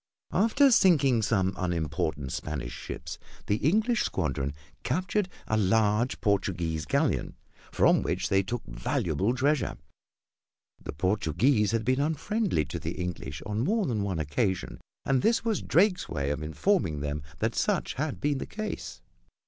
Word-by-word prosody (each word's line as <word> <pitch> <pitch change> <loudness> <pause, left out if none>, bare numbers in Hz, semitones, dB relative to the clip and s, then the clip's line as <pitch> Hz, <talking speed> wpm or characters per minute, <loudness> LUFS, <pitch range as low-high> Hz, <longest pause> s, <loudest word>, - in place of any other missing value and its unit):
After 265 +6 +4
sinking 145 - +5
some 95 -3 +1
unimportant 80 -5 -2
Spanish 70 -5 -4
ships, - - -7 0.3
the 105 - +1
English 215 - +2
squadron 70 -5 -2 0.3
captured 185 +7 0 0.2
a 110 - +1
large 110 +3 +2
Portuguese 90 -6 0
galleon, - - 0 0.4
from - - +4
which - - -1
they 95 0 +4
took 120 +5 -4
a - - -10
valuable 80 - 0
treasure. 140 -1 +1 1.1
The - - -4
Portuguese 100 - +2
had 115 -1 0
been 130 +1 +2
unfriendly 160 - 0
to 70 - -5
the - - -4
English 85 -5 -5
on 105 +1 -2
more 205 - +1
than 115 -8 -1
one 100 -4 -2
occasion, 80 +6 -1 0.2
and 135 -2 +2
this 230 - +2
was 220 -3 0
Drake's 185 +1 +2
way 70 -3 -1
of 75 - -3
informing 80 - 0
them 75 0 -3 0.2
that - - 0
such - - 0
had 145 +1 -3
been 145 -2 0
the - - -5
case. 90 - -6
105 Hz, 150 wpm, -28 LUFS, -, 1.1 s, sinking